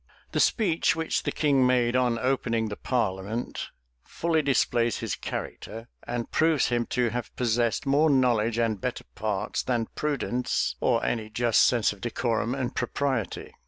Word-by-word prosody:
The -, -, -1 dB
speech 180 Hz, -10 st, +2 dB
which 160 Hz, 0 st, -1 dB
the -, -, -2 dB
king 140 Hz, -4 st, +2 dB
made 125 Hz, -1 st, +2 dB
on 125 Hz, -2 st, +2 dB
opening 115 Hz, -3 st, 0 dB
the 105 Hz, -, -4 dB
parliament, 110 Hz, -1 st, -2 dB, 0.3 s
fully 160 Hz, -, 0 dB
displays 120 Hz, -4 st, +1 dB
his -, -, -3 dB
character, 115 Hz, +2 st, -6 dB, 0.2 s
and 120 Hz, -1 st, -3 dB
proves 160 Hz, -3 st, +3 dB
him 120 Hz, -1 st, 0 dB
to 125 Hz, -2 st, +1 dB
have 120 Hz, -2 st, -5 dB
possessed 120 Hz, -1 st, 0 dB
more 145 Hz, +3 st, +3 dB
knowledge 120 Hz, -5 st, +2 dB
and 110 Hz, -4 st, 0 dB
better 125 Hz, -, -3 dB
parts, 105 Hz, -2 st, -2 dB
than 120 Hz, -3 st, -1 dB
prudence, 130 Hz, -4 st, -1 dB
or 115 Hz, -2 st, +1 dB
any 110 Hz, -2 st, -2 dB
just 115 Hz, +1 st, +2 dB
sense 115 Hz, -4 st, +2 dB
of 100 Hz, -, -17 dB
decorum 120 Hz, 0 st, -1 dB
and 130 Hz, -2 st, -3 dB
propriety. 130 Hz, -2 st, -2 dB
120 Hz, 155 wpm, -27 LUFS, 115-130 Hz, 0.3 s, proves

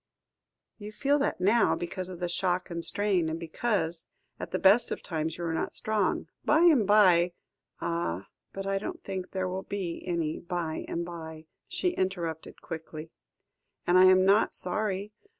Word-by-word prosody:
"You 210 Hz, 0 st, -7 dB
feel 280 Hz, +6 st, +1 dB
that 280 Hz, -, 0 dB
now, 210 Hz, +5 st, +3 dB
because 180 Hz, +1 st, -5 dB
of 180 Hz, -2 st, -8 dB
the 175 Hz, -, -1 dB
shock 180 Hz, +1 st, -1 dB
and 170 Hz, 0 st, -4 dB
strain, 195 Hz, -5 st, +1 dB
and 160 Hz, +1 st, -3 dB
because, 170 Hz, -1 st, -2 dB, 0.3 s
at -, -, -5 dB
the -, -, -1 dB
best 200 Hz, +5 st, +5 dB
of -, -, -4 dB
times, 160 Hz, -1 st, -3 dB
you 175 Hz, -, -5 dB
are 165 Hz, -1 st, -1 dB
not -, -, -2 dB
strong. 210 Hz, -6 st, 0 dB, 0.2 s
By 305 Hz, +2 st, +4 dB
and 300 Hz, -, +5 dB
by 180 Hz, -4 st, +5 dB, 0.2 s
" -, -, -37 dB
"Ah! 135 Hz, -, -2 dB, 0.2 s
but 195 Hz, 0 st, -6 dB
I 195 Hz, 0 st, 0 dB
don't -, -, -6 dB
think 190 Hz, -2 st, -5 dB
there 190 Hz, -1 st, -2 dB
will 185 Hz, +1 st, -3 dB
be 190 Hz, -4 st, -4 dB
any 165 Hz, -3 st, -1 dB
by 170 Hz, -2 st, -3 dB
and 170 Hz, 0 st, -3 dB
by," 160 Hz, -2 st, -8 dB, 0.2 s
she 365 Hz, -, 0 dB
interrupted 175 Hz, -, -3 dB
quietly, 160 Hz, -1 st, -7 dB, 0.7 s
"and 175 Hz, -, +3 dB
I 185 Hz, 0 st, +8 dB
am 185 Hz, 0 st, +6 dB
not 200 Hz, +3 st, +4 dB
sorry. 200 Hz, +2 st, -2 dB
185 Hz, 175 wpm, -28 LUFS, 170-200 Hz, 0.7 s, I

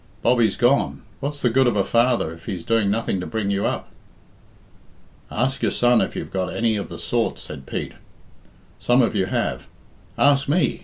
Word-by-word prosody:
"Bobbie's 120 Hz, -4 st, +3 dB
gone. 125 Hz, +4 st, +2 dB, 0.2 s
What's 145 Hz, +1 st, -4 dB
the 125 Hz, -, +3 dB
good 130 Hz, +2 st, +4 dB
of 120 Hz, -, +1 dB
a 100 Hz, -, +2 dB
father 115 Hz, -8 st, +1 dB
if 85 Hz, 0 st, -15 dB
he's 90 Hz, -4 st, -5 dB
doing 115 Hz, -3 st, +2 dB
nothing 100 Hz, -2 st, -1 dB
to 90 Hz, -, -5 dB
bring 110 Hz, -3 st, -2 dB
you 100 Hz, 0 st, 0 dB
up?" -, -, -4 dB, 1.4 s
"Ask 130 Hz, +4 st, -1 dB
your -, -, +2 dB
son 120 Hz, -1 st, +3 dB
if -, -, -2 dB
you've -, -, -5 dB
got 95 Hz, -1 st, -1 dB
any 115 Hz, -1 st, +1 dB
of 100 Hz, -, -4 dB
the -, -, -7 dB
sort," -, -, -1 dB
said 70 Hz, 0 st, -10 dB
Pete; -, -, -4 dB, 0.9 s
"some 120 Hz, +1 st, +3 dB
of 115 Hz, -, +1 dB
you 95 Hz, -3 st, 0 dB
have. -, -, -2 dB, 0.5 s
Ask 140 Hz, -1 st, +3 dB
me. 145 Hz, -5 st, +1 dB
115 Hz, 190 wpm, -22 LUFS, 100-125 Hz, 1.4 s, good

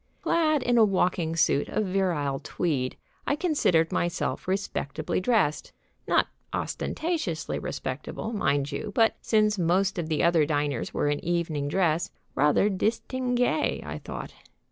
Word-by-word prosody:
Clad 310 Hz, -3 st, +2 dB
in 240 Hz, -1 st, +3 dB
a -, -, +8 dB
walking 180 Hz, -5 st, +1 dB
suit 145 Hz, -3 st, +2 dB
of 215 Hz, -, 0 dB
virile 175 Hz, -8 st, 0 dB
tweed, 135 Hz, -7 st, -2 dB, 0.3 s
I 285 Hz, -, +2 dB
considered 285 Hz, -, +2 dB
myself 175 Hz, +1 st, -1 dB
respectably 165 Hz, -6 st, -2 dB
dressed. 190 Hz, -8 st, +1 dB, 0.3 s
Not -, -, +3 dB, 0.2 s
ostentatiously 310 Hz, -, -2 dB
respectable, 145 Hz, -, -5 dB
mind 145 Hz, -7 st, 0 dB
you, 175 Hz, +9 st, -4 dB
but, 225 Hz, -1 st, +3 dB
since 215 Hz, -2 st, +2 dB
most 185 Hz, +2 st, +2 dB
of 165 Hz, -2 st, -3 dB
the 155 Hz, -, +1 dB
other 170 Hz, -2 st, +4 dB
diners 145 Hz, -3 st, -1 dB
were -, -, 0 dB
in 145 Hz, 0 st, -1 dB
evening 165 Hz, -4 st, -1 dB
dress, 170 Hz, 0 st, +1 dB, 0.2 s
rather 150 Hz, +7 st, +3 dB
distingué, 245 Hz, +7 st, 0 dB
I -, -, -5 dB
thought. -, -, -7 dB
175 Hz, 135 wpm, -27 LUFS, 150-215 Hz, 0.3 s, a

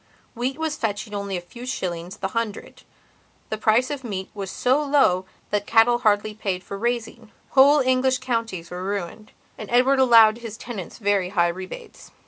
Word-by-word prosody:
Wheat 255 Hz, +3 st, -3 dB
was 320 Hz, -2 st, -2 dB
fetching 210 Hz, -1 st, -3 dB
only 200 Hz, -2 st, -3 dB
a -, -, -5 dB
few 235 Hz, +8 st, -12 dB
shillings 180 Hz, -7 st, -4 dB
the 190 Hz, -, -3 dB
hundred; 230 Hz, -2 st, -4 dB, 0.7 s
the 215 Hz, -, -1 dB
price 235 Hz, +6 st, +2 dB
of 285 Hz, -2 st, -5 dB
meat 195 Hz, -5 st, -5 dB
was 195 Hz, -2 st, -5 dB
so 260 Hz, +8 st, +1 dB
low 270 Hz, -11 st, +3 dB, 0.3 s
that 205 Hz, -1 st, -1 dB
cattle 235 Hz, +1 st, +4 dB
hardly 215 Hz, -2 st, +1 dB
paid 195 Hz, -4 st, -3 dB
for 200 Hz, -, -7 dB
raising; 230 Hz, 0 st, -3 dB, 0.2 s
whole 280 Hz, +2 st, +6 dB
English 260 Hz, 0 st, +2 dB
counties 230 Hz, -9 st, -3 dB
were 180 Hz, +1 st, -5 dB
ruined. 200 Hz, +2 st, -5 dB, 0.3 s
And 215 Hz, -, -7 dB
Edward 255 Hz, +3 st, +3 dB
allowed 230 Hz, -3 st, +6 dB
his 225 Hz, -2 st, -8 dB
tenants 220 Hz, -7 st, -7 dB
very 200 Hz, -4 st, +1 dB
high 175 Hz, -3 st, +2 dB
rebates. 185 Hz, -, -9 dB
220 Hz, 170 wpm, -23 LUFS, 195-250 Hz, 0.7 s, whole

